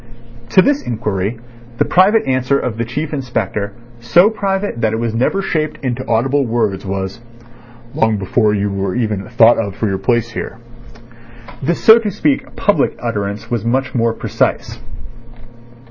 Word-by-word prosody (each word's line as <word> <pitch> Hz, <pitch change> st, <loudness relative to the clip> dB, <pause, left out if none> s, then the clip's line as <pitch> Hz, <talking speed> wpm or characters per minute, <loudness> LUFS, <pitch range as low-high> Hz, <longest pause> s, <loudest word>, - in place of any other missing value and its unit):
To 185 Hz, -, +5 dB
this 285 Hz, 0 st, +2 dB
inquiry 110 Hz, -2 st, -2 dB, 0.4 s
the -, -, +2 dB
private 200 Hz, +5 st, +4 dB
answer 130 Hz, +1 st, +1 dB
of 115 Hz, -4 st, -3 dB
the 115 Hz, -, 0 dB
Chief 145 Hz, +7 st, -4 dB
Inspector, 115 Hz, -7 st, -2 dB, 0.3 s
so 175 Hz, -, +4 dB
private 195 Hz, -, -2 dB
that 110 Hz, -1 st, +1 dB
it -, -, 0 dB
was 115 Hz, -1 st, -2 dB
never 130 Hz, +12 st, 0 dB
shaped 155 Hz, -4 st, -2 dB
into 120 Hz, -2 st, -2 dB
audible 135 Hz, +5 st, +1 dB
words, 110 Hz, -5 st, -1 dB
was: 95 Hz, +3 st, -4 dB, 0.7 s
"Long 110 Hz, -1 st, +1 dB
before 105 Hz, +2 st, +1 dB
you 100 Hz, 0 st, -1 dB
were 100 Hz, -1 st, -2 dB
even 105 Hz, -5 st, -1 dB
thought 120 Hz, -1 st, +5 dB
of 100 Hz, -4 st, -3 dB
for 110 Hz, -, -1 dB
your 95 Hz, -1 st, -2 dB
place 120 Hz, -1 st, 0 dB
here." 115 Hz, -, -6 dB, 1.0 s
The 165 Hz, +6 st, 0 dB
so 220 Hz, +6 st, +7 dB
to 220 Hz, -2 st, -2 dB
speak 150 Hz, -7 st, -1 dB
public -, -, +1 dB
utterance 100 Hz, +1 st, -4 dB
was 120 Hz, -2 st, -1 dB
much 130 Hz, +3 st, -1 dB
more 115 Hz, -2 st, +1 dB
precise. -, -, -2 dB
120 Hz, 160 wpm, -17 LUFS, 105-140 Hz, 1.0 s, so